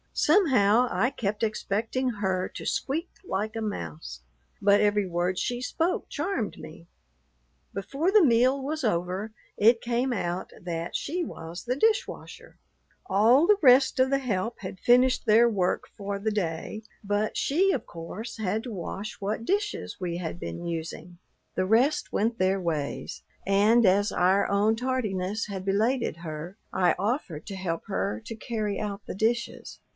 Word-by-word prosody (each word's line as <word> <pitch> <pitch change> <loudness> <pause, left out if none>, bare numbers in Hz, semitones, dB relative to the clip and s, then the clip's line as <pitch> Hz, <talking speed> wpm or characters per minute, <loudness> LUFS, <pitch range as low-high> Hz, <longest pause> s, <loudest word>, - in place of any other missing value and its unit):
Somehow 250 - +4
I 245 - +2
kept 210 -6 -3
expecting 225 +3 -1
her 190 -5 -1
to - - -8
squeak 320 +6 -1
like 215 - -3
a 225 - -3
mouse, 75 - -5 0.4
but 200 +1 +5
every 205 -1 +2
word 180 +1 -1
she 245 0 -2
spoke 330 +7 -1
charmed 245 - -2
me. 165 +2 -11 0.9
Before 275 - -1
the 420 -2 +6
meal 255 +1 +4
was 300 +3 -3
over 185 +1 -1 0.3
it 230 +3 +5
came 245 +2 0
out 180 -5 -3
that 170 -1 -4
she 345 +5 -2
was 165 - -7
the 250 +1 0
dish 435 +9 +3
washer. - - -11 0.5
All 240 - +5
the 420 - +6
rest 260 -1 +6
of 260 0 +4
the 275 - +3
help 230 -3 -2
had 190 -1 -7
finished 250 +1 +4
their 225 +2 +6
work 195 -6 0
for 200 0 -4
the 215 +2 -1
day, 200 +2 -3 0.2
but 205 +1 -1
she, 370 +7 +2
of 270 - -2
course, 190 +8 -7
had 215 +1 -1
to 245 - -6
wash 200 +2 -6
what 215 +3 -2
dishes 410 - -1
we 175 -2 -3
had 175 -1 -5
been 175 - -6
using. 165 +1 -5 0.4
The 185 - +1
rest 240 +9 +2
went 230 +2 0
their 190 +1 +2
ways; 155 -5 -3 0.2
and 210 +4 +4
as 200 +2 +3
our 185 +3 +3
own 205 +2 +3
tardiness 220 -5 -1
had 195 -2 -5
belated 220 +2 +1
her, 165 +3 -7 0.2
I 180 -3 +3
offered 200 - -2
to 200 - -5
help 175 -3 -3
her 100 +4 -2
to 225 - -6
carry 215 -2 -3
out 205 -1 -4
the - - -6
dishes. 230 +4 -2
210 Hz, 160 wpm, -27 LUFS, 185-245 Hz, 0.9 s, the